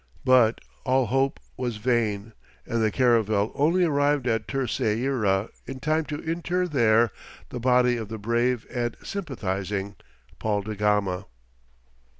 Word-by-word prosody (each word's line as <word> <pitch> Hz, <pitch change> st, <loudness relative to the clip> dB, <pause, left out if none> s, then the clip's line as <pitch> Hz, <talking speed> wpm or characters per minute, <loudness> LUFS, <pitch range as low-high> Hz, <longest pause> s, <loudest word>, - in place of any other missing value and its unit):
But 125 Hz, -3 st, +5 dB, 0.2 s
all 130 Hz, 0 st, +2 dB
hope 135 Hz, +3 st, 0 dB, 0.2 s
was 120 Hz, -4 st, -2 dB
vain, 110 Hz, -2 st, 0 dB, 0.3 s
and 115 Hz, 0 st, -1 dB
the 110 Hz, -, +3 dB
caravel 110 Hz, -4 st, +2 dB
only 170 Hz, +6 st, +2 dB
arrived 145 Hz, -3 st, +2 dB
at 115 Hz, -2 st, 0 dB
Terceira 115 Hz, -5 st, 0 dB, 0.2 s
in 135 Hz, 0 st, -6 dB
time 155 Hz, +2 st, 0 dB
to 150 Hz, -, -4 dB
inter 175 Hz, +2 st, -1 dB
there 115 Hz, -, +3 dB, 0.4 s
the 125 Hz, -, -5 dB
body 125 Hz, 0 st, +3 dB
of 110 Hz, -2 st, -5 dB
the 110 Hz, -, -5 dB
brave 115 Hz, +2 st, 0 dB
and 120 Hz, -1 st, -2 dB
sympathizing 100 Hz, -, -3 dB, 0.4 s
Paul 105 Hz, -2 st, 0 dB
da 110 Hz, +1 st, -4 dB
Gama. 105 Hz, -2 st, 0 dB
120 Hz, 135 wpm, -25 LUFS, 105-135 Hz, 0.4 s, But